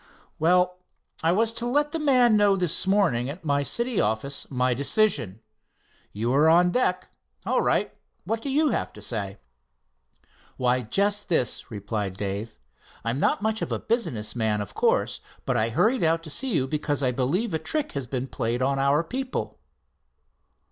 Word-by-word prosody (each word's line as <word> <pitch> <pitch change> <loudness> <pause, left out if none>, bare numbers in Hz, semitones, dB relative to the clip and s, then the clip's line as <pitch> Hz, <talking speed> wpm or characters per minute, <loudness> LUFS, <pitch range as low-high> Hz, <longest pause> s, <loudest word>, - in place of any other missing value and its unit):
"Well, 180 +2 +2 0.4
I 165 - +3
was 225 +5 +2
to 235 +1 -2
let 295 +4 +1
the 325 - -2
man 255 -6 +4
know 205 -1 +4
this 180 -1 0
morning 170 -12 +2
at 165 +4 -8
my 145 -1 +1
city 235 - +1
office 110 +6 -1
my 125 -1 +1
decision. 135 - +1 0.7
You 115 +4 -1
are 150 +3 +5
on 175 +2 +5
deck. 185 -7 0 0.3
All - - +1
right, - - +1 0.3
what 225 0 -3
have 275 - -2
you 300 +1 +2
got - - -3
to - - -11
say?" 100 -4 -3 1.2
"Why, 125 0 +1
just 200 - 0
this," 145 -8 0
replied 100 -2 -4
Dave: 100 +2 -4 0.5
"I'm 115 +4 -1
not 200 - +1
much 220 0 0
of - - -3
a - - 0
business 130 - -2
man, 110 -3 0
of 105 -2 -6
course, - - +1 0.2
but 130 - 0
I 110 -1 +2
hurried 220 - +2
on 165 0 +3
to 160 -2 -8
see 260 - +1
you 130 - +1
because 145 -1 -1
I 130 - +2
believe 155 - -1
a 160 - 0
trick 290 - -2
has 135 -3 -4
been 130 0 -3
played 120 -1 -2
on 135 +1 +1
our 140 +4 +2
people." 260 +9 -4
155 Hz, 175 wpm, -25 LUFS, -, 1.2 s, are